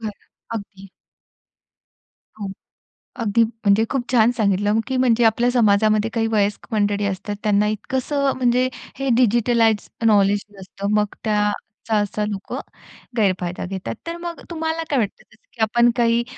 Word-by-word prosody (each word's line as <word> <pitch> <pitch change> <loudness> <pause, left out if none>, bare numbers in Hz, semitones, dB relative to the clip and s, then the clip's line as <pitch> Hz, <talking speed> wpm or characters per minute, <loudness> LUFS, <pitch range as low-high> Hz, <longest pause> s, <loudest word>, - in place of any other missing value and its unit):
बरं, 220 -2 -3 0.4
अगदी. 195 -2 -8 1.5
हो. 200 - -4 0.7
अगदी, 230 0 +3
म्हणजे 220 -2 +1
खूप 270 -3 -1
छान 235 -1 +5
सांगितलं, 205 +1 +2
की 260 -1 -1
म्हणजे 240 -2 +3
आपल्या 235 +2 +3
समाजामध्ये 215 -2 +3
काही 225 -2 +1
वयस्क 205 -1 0
मंडळी 205 -1 +1
असतात, 200 +1 -3
त्यांना 210 0 +3
इतकंसं 265 +6 -1
म्हणजे 250 0 +2 0.3
हे, 270 -1 -1
डिजिटलाइज 230 -2 +3 0.2
नॉलेज 205 -1 +4 0.2
नसतं, 195 +1 -5
मग 210 -1 +1
त्याचा 210 +1 -1
असा 210 0 -1
लोकं 195 -2 -5 0.6
गैरफायदा 185 -4 0
घेतात. 180 -12 -5
तर, 335 0 -4
मग 345 -1 -6
तुम्हाला 320 0 -2
काय 280 -3 +2
वाटतं? 210 -3 -3
जसं - - -24
की 230 - -9
आपण 235 +2 +4
काही 235 0 +3
220 Hz, 140 wpm, -21 LUFS, 205-240 Hz, 1.5 s, छान